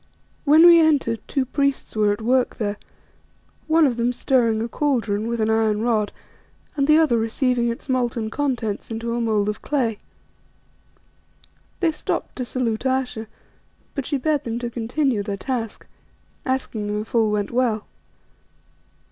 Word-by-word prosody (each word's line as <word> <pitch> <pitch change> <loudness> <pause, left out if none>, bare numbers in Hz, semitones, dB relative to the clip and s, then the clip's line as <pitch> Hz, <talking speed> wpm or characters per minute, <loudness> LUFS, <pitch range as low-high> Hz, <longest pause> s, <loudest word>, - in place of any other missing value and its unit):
When 310 +3 +7
we 340 -1 +9
entered 285 -8 +2
two 270 -2 0
priests 280 -1 -1
were 210 -1 +3
at 205 +2 -3
work 250 +2 +2
there: 205 -2 -2 0.9
one 320 0 +5
of 245 -4 0
them 240 +1 +1
stirring 240 -3 +1
a 225 - -2
cauldron 230 -6 -1
with 235 0 -2
an 220 0 +1
iron 220 -1 +1
rod 220 -3 +1 0.6
and 280 -2 +1
the 305 0 +6
other 305 -8 +3
receiving 240 +1 +1
its 235 - -6
molten 240 -4 -1
contents 245 -8 -2
into 230 +1 -3
a 240 - -1
mould 215 -3 +1
of 210 - -3
clay. 240 -8 -1 1.8
They 335 -3 +3
stopped 305 - -4
to 250 - -2
salute 235 -2 -2
Ayesha, 260 -4 -1 0.7
but 275 -3 -4
she 290 - 0
bade 295 +1 0
them 230 0 -3
to 240 0 -4
continue 240 +1 0
their 200 -1 -4
task, 230 -1 -4 0.6
asking 260 -5 -2
them 210 0 -1
if 220 - -11
all 225 -2 +3
went 210 -1 -1
well. 235 -4 0
235 Hz, 155 wpm, -22 LUFS, 220-265 Hz, 1.8 s, we